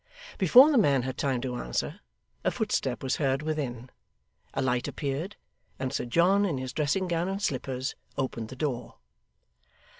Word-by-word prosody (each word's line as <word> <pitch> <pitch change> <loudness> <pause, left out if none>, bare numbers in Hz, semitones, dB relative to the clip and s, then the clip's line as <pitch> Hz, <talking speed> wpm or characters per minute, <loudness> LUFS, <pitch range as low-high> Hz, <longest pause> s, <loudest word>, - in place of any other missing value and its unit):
Before 250 - +8
the 275 - +5
man 140 - +3
had 130 0 -3
time 130 -3 0
to 125 -1 -3
answer, - - -3 0.4
a - - +3
footstep - - -1
was 130 - 0
heard 135 0 +1
within, 135 -6 -3 0.6
a - - -3
light 125 -1 +1
appeared, 150 +8 -3 0.4
and 130 0 -3
Sir 135 - -1
John, 180 +11 +4
in 175 -9 0
his 130 -1 -5
dressing 155 +5 0
gown 170 0 0
and 195 +1 -2
slippers, 130 -6 -2 0.2
opened 125 -4 -2
the 130 - -8
door. 125 -4 -3
135 Hz, 160 wpm, -28 LUFS, 130-170 Hz, 0.6 s, Before